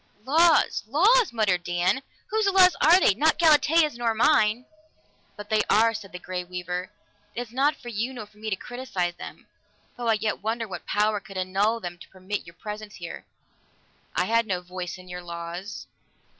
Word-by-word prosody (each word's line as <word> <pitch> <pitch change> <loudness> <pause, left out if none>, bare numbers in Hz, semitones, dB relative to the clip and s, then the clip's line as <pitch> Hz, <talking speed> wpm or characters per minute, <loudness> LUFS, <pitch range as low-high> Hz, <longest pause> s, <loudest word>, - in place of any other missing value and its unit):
"Laws! 325 +5 +4
Laws!" 410 - +4
muttered 205 -6 +1
Dan. 175 +7 0 0.3
"Whose 435 -1 +1
laws 375 -2 +6
are 340 +4 +7
they? 210 - +4
Not 310 +10 +2
Galatea's 315 -2 +4
nor 230 -2 0
mine!" 220 +1 +3 0.7
"But 205 +1 -10
they 215 -1 +4
are," 225 +2 +4
said 205 -3 -8
the 180 - -7
Grey 180 0 -5
Weaver. 180 0 -5 0.5
"It 240 - -2
is 240 -2 -8
not 275 +5 +2
for 240 - -10
you 235 +3 -2
nor 235 -5 -7
for 210 0 -23
me 220 0 -4
to 200 - 0
criticize 190 -7 -4
them - - -10 0.5
though 240 -1 -4
I 225 - +4
yet 215 0 -2
wonder 225 +2 -2
what 190 - -8
power 210 0 +1
could 195 -1 -11
annul 195 +5 0
them 175 -4 -7
to - - -14
permit 190 0 -6
your 170 - -13
presence 210 +2 -8
here!" 170 -2 -8 0.9
"I - - +2
had 230 0 +1
no 185 -3 -1
voice 180 0 -6
in 185 0 -14
your 180 0 -7
laws." 170 +3 -7
215 Hz, 185 wpm, -25 LUFS, 185-245 Hz, 0.9 s, are